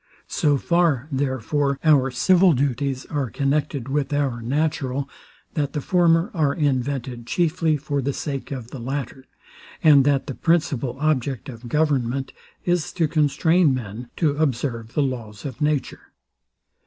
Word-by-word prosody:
So 145 -2 +1
far, 160 -4 +1
therefore, 140 +1 0
our 145 -4 +4
civil 180 +7 +4
duties 135 0 -1
are 145 -5 -1
connected 140 0 -1
with 140 +1 -1
our 140 -5 0
natural, 140 +1 -1 0.5
that 145 -3 -1
the 150 - -1
former 170 - +2
are 150 -6 +1
invented 130 -4 -1
chiefly 165 -2 +1
for 145 -1 -2
the 140 +2 -1
sake 140 0 -4
of 125 -4 -6
the 135 - -7
latter; 130 +1 -5 0.6
and 145 -3 +7
that 140 -2 +2
the 135 - -5
principal 140 -6 0
object 140 -4 -1
of 120 -1 -9
government 135 -3 0 0.3
is 175 -2 0
to 165 -3 +1
constrain 155 +1 +3
men 120 0 -6
to 150 -4 +1
observe 120 -6 -1
the 150 - +3
laws 115 -5 -5
of 135 -2 -6
nature. 150 -2 -1
140 Hz, 140 wpm, -23 LUFS, 130-150 Hz, 0.6 s, and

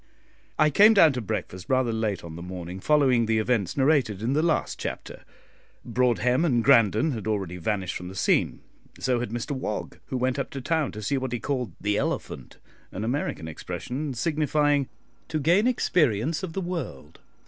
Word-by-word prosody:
I 155 0 +4
came 210 +8 +7
down 165 -7 +7
to 125 - -3
breakfast 90 -2 -5
rather 130 -3 +2
late 110 -4 -2
on 80 -1 -8
the 85 - -8
morning 90 0 -7
following 130 -3 +3
the 110 0 +2
events 110 -3 0
narrated 130 -8 +2
in 125 +4 0
the 150 - +2
last 165 -2 0
chapter. - - -6 0.6
Broadhem 125 +2 +2
and 125 -9 +2
Grandon 120 +2 +4
had 110 -5 -5
already 95 -5 -2
vanished 95 +1 -2
from 90 - -8
the 95 - -9
scene; - - +1 0.4
so 125 -2 +1
had 120 - -3
Mr 120 +5 -4
Wog, 135 -2 -4
who 130 - -3
went 130 +2 0
up - - -3
to 135 - -6
town 155 +2 0
to 105 0 -7
see 140 +5 0
what 130 -2 -4
he 120 - -1
called 130 -3 -3
"the 105 0 0
elephant," - - -4 0.3
an 95 - -5
American 120 - -2
expression, 120 - -5
signifying 145 -1 +1 0.4
"to 155 - -2
gain 175 - +3
experience 155 - +1
of 185 -4 -5
the 195 - -2
world." 160 - -6
125 Hz, 180 wpm, -26 LUFS, 105-150 Hz, 0.6 s, came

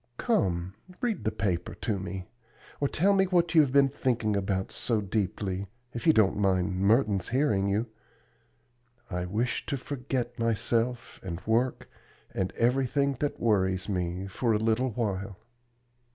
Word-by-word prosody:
Come, 95 - 0 0.3
read 235 -4 -2
the 110 - +2
paper 90 -4 -2
to 100 +1 -2
me, 95 0 -5 0.5
or 140 - +2
tell 195 +8 +3
me 190 -1 +4
what 175 -2 +2
you 160 - +8
have 140 -4 +1
been 140 0 +5
thinking 120 -6 0
about 95 -1 -1
so 115 -3 0
deeply, 100 -1 -2 0.3
if 120 - -4
you - - +9
don't 110 -10 +3
mind 95 -2 +1
Merton's 100 -2 +2
hearing 115 -7 +2
you. 105 +4 +1 1.3
I 90 0 -2
wish 115 +6 -1
to 140 - -1
forget 125 -3 -4
myself, 115 +1 0
and 85 -3 -5
work, 120 +3 +1 0.5
and 95 -1 -1
everything 135 +3 +1
that 145 - -2
worries 95 -4 +1
me, 90 -1 -2
for 110 +4 0
a - - +3
little 115 +4 +1
while." 100 -4 -3
110 Hz, 150 wpm, -28 LUFS, 95-130 Hz, 1.3 s, you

